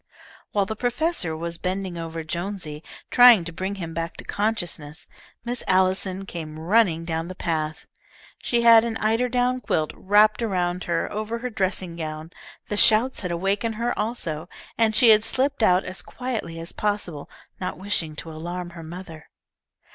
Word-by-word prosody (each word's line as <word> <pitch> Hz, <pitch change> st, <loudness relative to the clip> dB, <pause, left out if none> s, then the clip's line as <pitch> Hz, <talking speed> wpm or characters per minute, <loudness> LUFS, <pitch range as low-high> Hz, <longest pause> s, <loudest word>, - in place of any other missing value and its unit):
While 200 Hz, -1 st, +2 dB
the 220 Hz, -, -4 dB
professor 245 Hz, -, 0 dB
was 170 Hz, +1 st, -4 dB
bending 185 Hz, -1 st, -3 dB
over 165 Hz, -1 st, -5 dB
Jonesy, 170 Hz, -2 st, -4 dB, 0.3 s
trying 245 Hz, -6 st, +8 dB
to 170 Hz, -, -5 dB
bring 190 Hz, +4 st, -4 dB
him 170 Hz, -4 st, -6 dB
back 165 Hz, 0 st, -4 dB
to -, -, -7 dB
consciousness, 175 Hz, -7 st, -2 dB, 0.4 s
Miss 245 Hz, +1 st, -3 dB
Allison 190 Hz, +1 st, +2 dB
came 160 Hz, -4 st, -7 dB
running 170 Hz, -1 st, +2 dB
down 165 Hz, 0 st, -2 dB
the 185 Hz, -, -7 dB
path. 155 Hz, -3 st, -2 dB, 0.5 s
She 235 Hz, -1 st, 0 dB
had 230 Hz, -1 st, +8 dB
an 230 Hz, -1 st, -2 dB
eiderdown 245 Hz, +3 st, +1 dB
quilt 155 Hz, -7 st, 0 dB
wrapped 210 Hz, +3 st, +3 dB
around 180 Hz, -4 st, -1 dB
her 170 Hz, -1 st, 0 dB
over 215 Hz, +2 st, -3 dB
her 250 Hz, +1 st, -5 dB
dressing 185 Hz, -4 st, -2 dB
gown. 155 Hz, 0 st, -6 dB, 0.4 s
The 210 Hz, -, -3 dB
shouts 225 Hz, +5 st, +5 dB
had 180 Hz, -, -4 dB
awakened 195 Hz, +6 st, -1 dB
her, 235 Hz, +2 st, -1 dB
also, 175 Hz, -7 st, -2 dB, 0.3 s
and 220 Hz, -1 st, +2 dB
she 235 Hz, +1 st, +6 dB
had 215 Hz, 0 st, +5 dB
slipped 270 Hz, +3 st, 0 dB
out 185 Hz, -3 st, +4 dB
as 185 Hz, +1 st, -5 dB
quietly 230 Hz, -10 st, -5 dB
as 165 Hz, +1 st, -5 dB
possible, 205 Hz, -8 st, -2 dB, 0.3 s
not 185 Hz, -4 st, -4 dB
wishing 180 Hz, -5 st, 0 dB
to 160 Hz, +2 st, -7 dB
alarm 175 Hz, +3 st, -6 dB
her 170 Hz, -1 st, -10 dB
mother. 165 Hz, -1 st, -10 dB
185 Hz, 160 wpm, -24 LUFS, 165-220 Hz, 0.5 s, trying